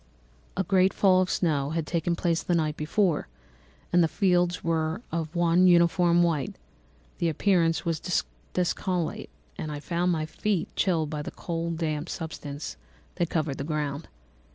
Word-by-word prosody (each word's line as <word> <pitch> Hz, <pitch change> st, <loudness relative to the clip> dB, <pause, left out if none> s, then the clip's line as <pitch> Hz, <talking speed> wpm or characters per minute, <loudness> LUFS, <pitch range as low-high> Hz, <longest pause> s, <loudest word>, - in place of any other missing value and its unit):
A 190 Hz, -, +2 dB
great 190 Hz, -1 st, +3 dB
fall 185 Hz, -2 st, +5 dB
of 185 Hz, -, 0 dB
snow 145 Hz, -5 st, +1 dB
had 165 Hz, -, -1 dB
taken 170 Hz, +2 st, 0 dB
place 170 Hz, -1 st, 0 dB
the 175 Hz, -, 0 dB
night 155 Hz, -2 st, 0 dB
before, 160 Hz, +2 st, 0 dB, 0.7 s
and 175 Hz, -1 st, +6 dB
the -, -, +4 dB
fields 180 Hz, -1 st, +1 dB
were 165 Hz, +5 st, -1 dB
of 165 Hz, 0 st, -3 dB
one 175 Hz, +1 st, +4 dB
uniform 175 Hz, 0 st, +5 dB
white; 155 Hz, -6 st, 0 dB, 0.6 s
the 170 Hz, -, +2 dB
appearance 165 Hz, 0 st, +2 dB
was 165 Hz, -2 st, -1 dB, 0.5 s
disconsolate, 180 Hz, -1 st, -1 dB, 0.3 s
and 155 Hz, -, -3 dB
I 145 Hz, -, -4 dB
found 175 Hz, +3 st, 0 dB
my 155 Hz, -2 st, 0 dB
feet 190 Hz, +2 st, -2 dB
chilled 160 Hz, -5 st, +1 dB
by 150 Hz, -1 st, -3 dB
the -, -, -5 dB
cold 165 Hz, -1 st, -4 dB
damp 155 Hz, -1 st, -2 dB
substance 150 Hz, -2 st, -6 dB, 0.4 s
that 175 Hz, -2 st, 0 dB
covered 155 Hz, -4 st, -1 dB
the -, -, -2 dB
ground. 150 Hz, 0 st, -3 dB
170 Hz, 155 wpm, -27 LUFS, 155-180 Hz, 0.7 s, and